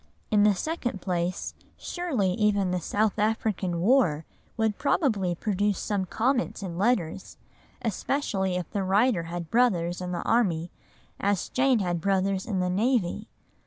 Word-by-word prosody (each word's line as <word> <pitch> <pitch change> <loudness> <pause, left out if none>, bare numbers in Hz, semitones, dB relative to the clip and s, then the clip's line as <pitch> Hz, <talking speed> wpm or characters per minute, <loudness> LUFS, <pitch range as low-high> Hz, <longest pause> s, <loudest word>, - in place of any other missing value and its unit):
In 210 -1 +4
the 205 -1 +5
second 245 - -3
place, 175 -1 -2 0.2
surely 275 - -1
even 200 -1 +1
the 180 -1 -1
South 210 +5 0
African 205 -5 0
War 180 - +3 0.3
would 220 -2 0
probably 210 - +1
produce 205 +1 0
some 200 -3 -1
comment 240 +3 0
in 175 -3 -5
letters, 190 -3 -1 0.5
especially 205 -4 -1
if 180 -2 -3
the 200 - -1
writer 195 -1 +2
had 170 -1 -6
brothers 185 -8 +2
in 180 0 -4
the 175 - -3
army 175 -8 +1 0.5
as 200 -2 0
Jane 260 -1 +3
had 175 -5 -1
brothers 195 0 0
in 195 -5 -1
the 180 - 0
navy. 210 0 0
200 Hz, 145 wpm, -27 LUFS, 180-225 Hz, 0.5 s, the